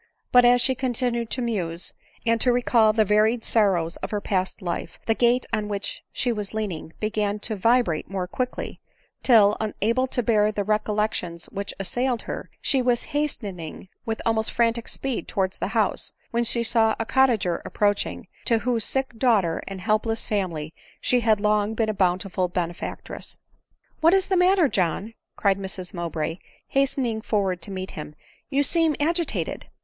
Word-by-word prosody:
But, 245 Hz, -1 st, +7 dB
as 245 Hz, 0 st, +6 dB
she 260 Hz, -, +3 dB
continued 245 Hz, -2 st, -1 dB
to 255 Hz, -, -2 dB
muse, 180 Hz, -7 st, -2 dB, 0.3 s
and 230 Hz, -1 st, +2 dB
to 250 Hz, -, +4 dB
recall 235 Hz, -3 st, +4 dB
the 215 Hz, 0 st, +2 dB
va 210 Hz, +1 st, +4 dB
ried 225 Hz, +2 st, +1 dB
sorrows 185 Hz, -7 st, +1 dB
of -, -, -5 dB
her 210 Hz, -, -1 dB
past 190 Hz, -2 st, -1 dB
life, 170 Hz, -1 st, -4 dB
the 225 Hz, -, +3 dB
gate 245 Hz, +2 st, +2 dB
on 215 Hz, -1 st, 0 dB
which 200 Hz, -1 st, -3 dB
she 245 Hz, -1 st, 0 dB
lean 210 Hz, -1 st, -3 dB
ed 160 Hz, 0 st, -9 dB
began 210 Hz, -1 st, -1 dB
to 220 Hz, -, -2 dB
vibrate 225 Hz, -5 st, +2 dB
more 190 Hz, -2 st, -2 dB
quickly 255 Hz, +6 st, -4 dB, 0.2 s
} -, -, -41 dB
till, 215 Hz, -4 st, +6 dB
unable 225 Hz, +4 st, 0 dB
to 245 Hz, -1 st, -1 dB
bear 215 Hz, -2 st, +3 dB
the 210 Hz, -1 st, -2 dB
recollections 210 Hz, -4 st, -1 dB
which 200 Hz, 0 st, -4 dB
assailed 245 Hz, +5 st, -1 dB
her, -, -, -6 dB
she 270 Hz, -3 st, +3 dB
was 245 Hz, -1 st, +2 dB
hastening 200 Hz, -, -3 dB
with 225 Hz, -1 st, -3 dB
almost 220 Hz, -1 st, +1 dB
frantic 235 Hz, 0 st, +1 dB
speed 270 Hz, -3 st, -3 dB
towards 190 Hz, -3 st, -1 dB
the -, -, -1 dB
house, -, -, +1 dB, 0.2 s
when 235 Hz, 0 st, +1 dB
she 235 Hz, 0 st, +3 dB
saw 225 Hz, -1 st, +3 dB
a 225 Hz, -, -1 dB
cottager 225 Hz, -10 st, +2 dB
approaching, 205 Hz, -1 st, -1 dB, 0.2 s
to 230 Hz, -, +3 dB
whose 230 Hz, -1 st, 0 dB
sick 265 Hz, 0 st, -1 dB
daughter 205 Hz, -10 st, +2 dB
and 195 Hz, -1 st, -6 dB
helpless 220 Hz, +2 st, 0 dB
family 170 Hz, -7 st, -2 dB, 0.3 s
she 250 Hz, -, +2 dB
had 220 Hz, -3 st, +3 dB
long 210 Hz, +1 st, +1 dB
been 220 Hz, -1 st, +1 dB
a -, -, 0 dB
bountiful 185 Hz, -1 st, 0 dB
benefac 175 Hz, 0 st, -3 dB
tress. -, -, -8 dB, 0.3 s
" -, -, -42 dB
What 330 Hz, +4 st, +6 dB
is 385 Hz, -1 st, +2 dB
the 380 Hz, -, +2 dB
matter, 365 Hz, -2 st, +5 dB
John 195 Hz, +1 st, -1 dB
?" -, -, -59 dB
cried 200 Hz, -1 st, +2 dB
Mrs 190 Hz, -2 st, -5 dB
Mowbray, 170 Hz, -1 st, -3 dB, 0.3 s
hastening 260 Hz, -5 st, +1 dB
forward 195 Hz, -5 st, 0 dB
to -, -, -8 dB
meet 190 Hz, -1 st, -5 dB
him 150 Hz, -1 st, -8 dB
— -, -, -28 dB
" -, -, -52 dB
you 285 Hz, 0 st, +2 dB
seem 325 Hz, +1 st, +3 dB
agitated." 335 Hz, +2 st, -1 dB
220 Hz, 180 wpm, -24 LUFS, 195-245 Hz, 0.3 s, But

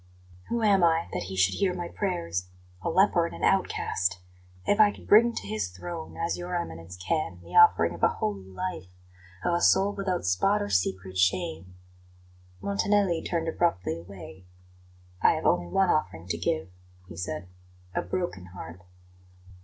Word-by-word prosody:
"Who 235 Hz, -1 st, -1 dB
am 200 Hz, -4 st, +4 dB
I, 165 Hz, 0 st, +3 dB
that -, -, -3 dB
He 95 Hz, -, -5 dB
should 95 Hz, 0 st, +3 dB
hear 190 Hz, -3 st, +1 dB
my 175 Hz, -1 st, -4 dB
prayers? 90 Hz, -, -3 dB, 0.3 s
A -, -, -2 dB
leper 175 Hz, -1 st, +3 dB
and -, -, -9 dB
an -, -, -8 dB
outcast! 90 Hz, -, +1 dB, 0.5 s
If 205 Hz, -, +2 dB
I 215 Hz, -1 st, +8 dB
could -, -, -14 dB
bring 230 Hz, +3 st, +6 dB
to -, -, -5 dB
His 105 Hz, -2 st, -2 dB
throne, 160 Hz, -, -7 dB
as 170 Hz, +1 st, -2 dB
Your 175 Hz, 0 st, -4 dB
Eminence 90 Hz, -, -5 dB
can, 90 Hz, -, -2 dB
the 85 Hz, -, -10 dB
offering 85 Hz, -, +6 dB
of 85 Hz, -, -10 dB
a -, -, +6 dB
holy 100 Hz, -3 st, -3 dB
life 170 Hz, -, -5 dB, 0.6 s
of 175 Hz, -, +2 dB
a 170 Hz, -, +1 dB
soul 195 Hz, +3 st, +4 dB
without 190 Hz, -, -2 dB
spot 90 Hz, 0 st, +2 dB
or 100 Hz, -, -3 dB
secret 95 Hz, -1 st, -1 dB
shame 95 Hz, -, 0 dB, 0.4 s
" 90 Hz, 0 st, -28 dB
Montanelli 170 Hz, -, +1 dB
turned 165 Hz, -2 st, -2 dB
abruptly 160 Hz, -, 0 dB
away. 95 Hz, +1 st, -12 dB, 0.7 s
"I -, -, +6 dB
have -, -, -4 dB
only 90 Hz, 0 st, +2 dB
one 190 Hz, -, +2 dB
offering 85 Hz, -, -1 dB
to 85 Hz, -, 0 dB
give," 95 Hz, -, -1 dB, 0.4 s
he 85 Hz, -, -10 dB
said; 90 Hz, +1 st, -5 dB, 0.5 s
"a -, -, 0 dB
broken 175 Hz, -, -3 dB
heart." 90 Hz, -1 st, -10 dB
100 Hz, 170 wpm, -27 LUFS, -, 0.7 s, I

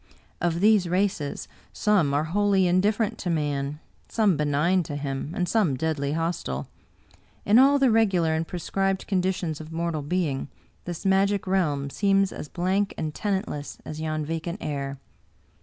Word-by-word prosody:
Of 170 Hz, -1 st, 0 dB
these 210 Hz, -4 st, +4 dB
races, 180 Hz, -6 st, -1 dB, 0.2 s
some 200 Hz, -9 st, +2 dB
are 145 Hz, +2 st, +1 dB
wholly 195 Hz, +3 st, +2 dB
indifferent 200 Hz, +4 st, +1 dB
to 180 Hz, -, -3 dB
man, 145 Hz, -2 st, -1 dB, 0.3 s
some 210 Hz, -6 st, +3 dB
benign 150 Hz, +5 st, +2 dB
to 145 Hz, -3 st, -5 dB
him, 140 Hz, 0 st, -4 dB
and 180 Hz, -, 0 dB
some 180 Hz, -, +2 dB
deadly 145 Hz, -1 st, -1 dB
hostile. 160 Hz, -, -2 dB, 0.8 s
In 215 Hz, +4 st, +6 dB
all 280 Hz, +2 st, +6 dB
the 270 Hz, -3 st, +4 dB
regular 190 Hz, -8 st, +3 dB
and 160 Hz, +1 st, -1 dB
prescribed 195 Hz, +2 st, -1 dB
conditions 185 Hz, -5 st, -1 dB
of 155 Hz, +1 st, -10 dB
mortal 165 Hz, -1 st, -2 dB
being, 145 Hz, -3 st, -1 dB, 0.4 s
this 175 Hz, 0 st, -6 dB
magic 195 Hz, +1 st, +2 dB
realm 150 Hz, -8 st, 0 dB
seems 195 Hz, +1 st, +2 dB
as 150 Hz, -, -7 dB
blank 190 Hz, +3 st, 0 dB
and 155 Hz, -1 st, -3 dB
tenantless 190 Hz, -8 st, -3 dB
as 155 Hz, 0 st, -6 dB
yon 155 Hz, -1 st, -2 dB
vacant 165 Hz, +3 st, -3 dB
air. 140 Hz, -2 st, -4 dB
175 Hz, 150 wpm, -25 LUFS, 150-195 Hz, 0.8 s, In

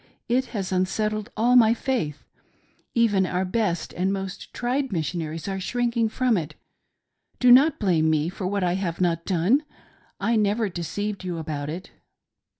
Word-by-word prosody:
It 255 Hz, +2 st, +2 dB
has 195 Hz, -7 st, -4 dB
unsettled 210 Hz, +4 st, -1 dB
all 240 Hz, +3 st, +3 dB
my 230 Hz, -2 st, +6 dB
faith; 225 Hz, -, -2 dB, 0.7 s
even 205 Hz, -5 st, +3 dB
our 180 Hz, +1 st, -1 dB
best 185 Hz, -3 st, -1 dB
and 185 Hz, +2 st, 0 dB
most 195 Hz, -1 st, -5 dB
tried 260 Hz, +2 st, -1 dB
Missionaries 165 Hz, -1 st, -3 dB
are 195 Hz, -1 st, -2 dB
shrinking 235 Hz, +2 st, 0 dB
from 250 Hz, -1 st, +1 dB
it. 155 Hz, -3 st, -4 dB, 0.8 s
Do 250 Hz, -1 st, +6 dB
not 275 Hz, +5 st, +6 dB
blame 170 Hz, -6 st, +2 dB
me 155 Hz, 0 st, +1 dB
for 185 Hz, +1 st, -4 dB
what 200 Hz, 0 st, -1 dB
I 175 Hz, -1 st, +1 dB
have 180 Hz, -3 st, -2 dB
not 170 Hz, -2 st, 0 dB
done. 195 Hz, -, +2 dB, 0.6 s
I 230 Hz, 0 st, +1 dB
never 210 Hz, +1 st, +1 dB
deceived 195 Hz, +4 st, -4 dB
you 180 Hz, -2 st, -3 dB
about 150 Hz, -2 st, -4 dB
it." 175 Hz, +5 st, -7 dB
195 Hz, 155 wpm, -25 LUFS, 175-230 Hz, 0.8 s, my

